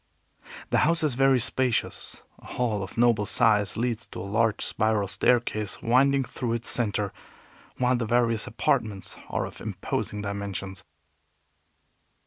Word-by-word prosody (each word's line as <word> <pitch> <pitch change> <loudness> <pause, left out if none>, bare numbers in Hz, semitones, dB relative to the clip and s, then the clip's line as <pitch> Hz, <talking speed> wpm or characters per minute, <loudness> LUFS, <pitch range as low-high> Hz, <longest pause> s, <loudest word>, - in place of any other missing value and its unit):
The - - +4
house 165 +2 +3
is 150 -4 +3
very 135 0 +4
spacious. 125 -1 -1 0.2
A - - -18
hall 115 -5 -1
of 95 - -7
noble 115 -3 +3
size 105 -3 +2
leads 120 0 -2
to - - -8
a - - -5
large 110 +2 +1
spiral 110 -2 +1
staircase 105 0 +1
winding 135 +3 +4
through 125 -2 -3
its 115 -1 -2
center, 105 -4 -1 0.6
while 125 0 +2
the 120 -2 -2
various 115 -1 +1
apartments 100 -3 -1
are - - -1
of - - -10
imposing 105 -1 -3
dimensions. 100 -2 -5
115 Hz, 135 wpm, -26 LUFS, 105-125 Hz, 0.6 s, The